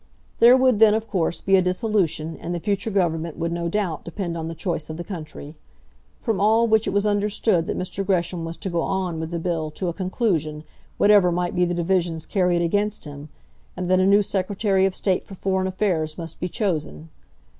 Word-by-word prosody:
There 240 Hz, +2 st, +8 dB
would 255 Hz, -4 st, +3 dB
then, 220 Hz, -1 st, +6 dB
of 225 Hz, 0 st, -2 dB
course, 175 Hz, -5 st, -1 dB
be 195 Hz, -, +3 dB
a -, -, +4 dB
dissolution, 180 Hz, -4 st, 0 dB
and 175 Hz, +1 st, -4 dB
the -, -, -3 dB
future 200 Hz, +3 st, -1 dB
Government 170 Hz, -5 st, -1 dB
would, 170 Hz, 0 st, -2 dB
no 170 Hz, 0 st, -2 dB
doubt, 185 Hz, -4 st, -2 dB
depend 170 Hz, 0 st, -4 dB
on 160 Hz, -1 st, -4 dB
the 165 Hz, -, -5 dB
choice 160 Hz, -2 st, -3 dB
of 155 Hz, -, -5 dB
the 175 Hz, -, -5 dB
country. 155 Hz, -4 st, -8 dB, 0.7 s
From 220 Hz, -6 st, 0 dB
all 220 Hz, +3 st, +4 dB
which 220 Hz, -1 st, +2 dB
it -, -, +2 dB
was 200 Hz, +1 st, +1 dB
understood 205 Hz, -4 st, +1 dB
that -, -, -2 dB
Mr. 185 Hz, +2 st, -3 dB
Gresham 175 Hz, -3 st, -1 dB
was 165 Hz, 0 st, -5 dB
to 195 Hz, -, -4 dB
go 170 Hz, -1 st, 0 dB
on 185 Hz, -4 st, -2 dB
with 160 Hz, 0 st, -4 dB
the 170 Hz, -, -3 dB
bill 165 Hz, -2 st, -2 dB
to 175 Hz, +4 st, -4 dB
a -, -, -3 dB
conclusion, 175 Hz, -, -1 dB, 0.3 s
whatever 205 Hz, -3 st, +5 dB
might 175 Hz, 0 st, -1 dB
be 180 Hz, 0 st, +2 dB
the 175 Hz, 0 st, -2 dB
divisions 170 Hz, -2 st, 0 dB
carried 180 Hz, -3 st, +1 dB
against 205 Hz, +4 st, -1 dB
him, 145 Hz, +1 st, -9 dB, 0.5 s
and 180 Hz, 0 st, -2 dB
that 185 Hz, -, +4 dB
a 185 Hz, -, +3 dB
new 200 Hz, +1 st, +5 dB
Secretary 195 Hz, 0 st, +1 dB
of 190 Hz, -, -4 dB
State 190 Hz, -3 st, 0 dB
for 195 Hz, -, -11 dB
Foreign 190 Hz, 0 st, -1 dB
Affairs 180 Hz, -5 st, -1 dB
must 165 Hz, -2 st, -8 dB
be 180 Hz, -, -3 dB
chosen. 155 Hz, -, -2 dB
180 Hz, 210 wpm, -23 LUFS, 165-200 Hz, 0.7 s, There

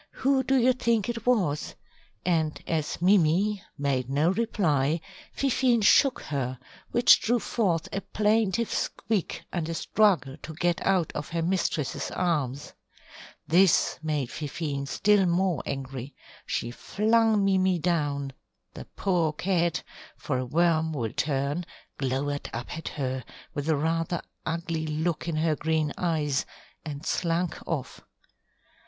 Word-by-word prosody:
Who 270 Hz, -1 st, +4 dB
do 265 Hz, +1 st, +1 dB
you 255 Hz, 0 st, +4 dB
think 235 Hz, -4 st, 0 dB
it 230 Hz, -1 st, -4 dB
was?" 180 Hz, -12 st, +1 dB, 0.5 s
and 160 Hz, -4 st, +1 dB
as 155 Hz, -3 st, -2 dB
Mimi 190 Hz, +2 st, +3 dB, 0.2 s
made 135 Hz, -3 st, -1 dB
no 150 Hz, +5 st, +2 dB
reply, 170 Hz, -9 st, +1 dB, 0.3 s
Fifine 255 Hz, -3 st, +2 dB
shook 260 Hz, +5 st, +5 dB
her, 130 Hz, -3 st, -3 dB, 0.3 s
which 240 Hz, +1 st, +6 dB
drew 240 Hz, +2 st, +2 dB
forth 190 Hz, -8 st, 0 dB
a 195 Hz, -, -1 dB
plaintive 215 Hz, +1 st, +1 dB
squeak 210 Hz, -5 st, -2 dB
and 170 Hz, -2 st, -2 dB
a 165 Hz, -, -2 dB
struggle 170 Hz, -11 st, +2 dB
to 160 Hz, -, -9 dB
get 175 Hz, +1 st, 0 dB
out 185 Hz, -4 st, +2 dB
of 150 Hz, -, -5 dB
her 165 Hz, 0 st, -1 dB
mistress's 165 Hz, -5 st, -1 dB
arms. 145 Hz, -6 st, -1 dB, 0.7 s
This 180 Hz, +2 st, +4 dB
made 150 Hz, -5 st, -2 dB
Fifine 145 Hz, -2 st, -4 dB
still 200 Hz, +6 st, +3 dB
more 175 Hz, -2 st, +1 dB
angry. 135 Hz, 0 st, -5 dB, 0.3 s
She 120 Hz, -, -2 dB
flung 220 Hz, -, +2 dB
Mimi 190 Hz, -2 st, +3 dB
down, 145 Hz, -5 st, -1 dB, 0.4 s
the -, -, -8 dB
poor 175 Hz, -5 st, +1 dB
cat 175 Hz, 0 st, 0 dB, 0.3 s
for 130 Hz, -4 st, -2 dB
a 130 Hz, -, -2 dB
worm 160 Hz, +1 st, +2 dB
will 115 Hz, -7 st, -3 dB
turn 145 Hz, +3 st, -1 dB, 0.4 s
glowered 140 Hz, +2 st, -2 dB
up 120 Hz, +1 st, -5 dB
at 160 Hz, -, -6 dB
her, 130 Hz, -3 st, -3 dB, 0.3 s
with 145 Hz, +2 st, -3 dB
a 160 Hz, -, +4 dB
rather 165 Hz, +3 st, -1 dB, 0.2 s
ugly 165 Hz, -1 st, -2 dB
look 160 Hz, +2 st, -1 dB
in 165 Hz, -, -1 dB
her 155 Hz, 0 st, +1 dB
green 155 Hz, 0 st, 0 dB
eyes, 150 Hz, -6 st, 0 dB, 0.4 s
and 150 Hz, -1 st, -6 dB
slunk 170 Hz, 0 st, 0 dB
off. -, -, -4 dB
165 Hz, 135 wpm, -27 LUFS, 145-195 Hz, 0.7 s, which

